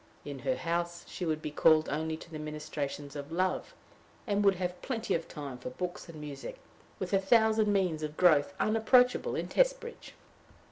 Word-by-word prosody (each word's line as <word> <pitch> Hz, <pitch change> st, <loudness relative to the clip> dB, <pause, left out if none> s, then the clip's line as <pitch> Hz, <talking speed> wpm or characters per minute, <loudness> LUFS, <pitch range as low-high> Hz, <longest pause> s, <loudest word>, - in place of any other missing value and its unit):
In 140 Hz, -2 st, -6 dB
her 260 Hz, -, 0 dB
house 170 Hz, -1 st, -2 dB
she 180 Hz, -, -4 dB
would 155 Hz, -1 st, -1 dB
be 150 Hz, -, -3 dB
called 155 Hz, +1 st, +5 dB
only 155 Hz, +2 st, -2 dB
to 170 Hz, -, -13 dB
the 155 Hz, -, -6 dB
ministrations 150 Hz, -2 st, -5 dB
of 145 Hz, +1 st, -6 dB
love, 185 Hz, -, -1 dB, 0.5 s
and 205 Hz, -2 st, +1 dB
would 200 Hz, -1 st, +5 dB
have 180 Hz, 0 st, -3 dB
plenty 235 Hz, -4 st, -2 dB
of 165 Hz, -, -1 dB
time 140 Hz, -4 st, -7 dB
for 125 Hz, -, -5 dB
books 175 Hz, +6 st, -5 dB
and 160 Hz, -2 st, -9 dB
music, 150 Hz, -, -7 dB, 0.4 s
with -, -, -4 dB
a 195 Hz, -, +5 dB
thousand 220 Hz, +1 st, +4 dB
means 180 Hz, -6 st, +1 dB
of 150 Hz, 0 st, -5 dB
growth 175 Hz, 0 st, +4 dB
unapproachable 245 Hz, +3 st, +3 dB
in -, -, -2 dB
Testbridge. -, -, 0 dB
170 Hz, 180 wpm, -31 LUFS, 150-205 Hz, 0.5 s, called